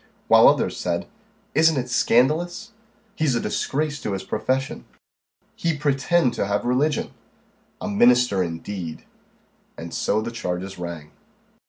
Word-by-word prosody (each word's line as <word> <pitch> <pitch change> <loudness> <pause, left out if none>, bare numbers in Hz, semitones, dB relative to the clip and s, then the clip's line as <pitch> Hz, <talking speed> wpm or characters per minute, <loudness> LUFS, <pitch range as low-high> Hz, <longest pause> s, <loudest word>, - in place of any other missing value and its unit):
While - - +7
others - - +2
said - - -2 0.5
"Isn't 160 0 +4
it 125 -1 -1
scandalous!" 155 - +1 0.4
"He's 150 -5 +1
a - - +1
disgrace 150 +3 -2
to 105 - -3
his 95 - -4
profession!" 130 +5 -2 0.7
"He 165 -2 -1
pretend 145 0 +1
to 100 - -2
have 100 0 -1
religion!" 135 +5 0 0.7
"A - - -5
minister 120 -1 +4
indeed!" 85 0 -5 0.7
And 85 0 -8
so - - 0
the 110 - -4
changes 95 -4 -4
rang. 85 -4 -7
125 Hz, 130 wpm, -23 LUFS, 100-150 Hz, 0.7 s, While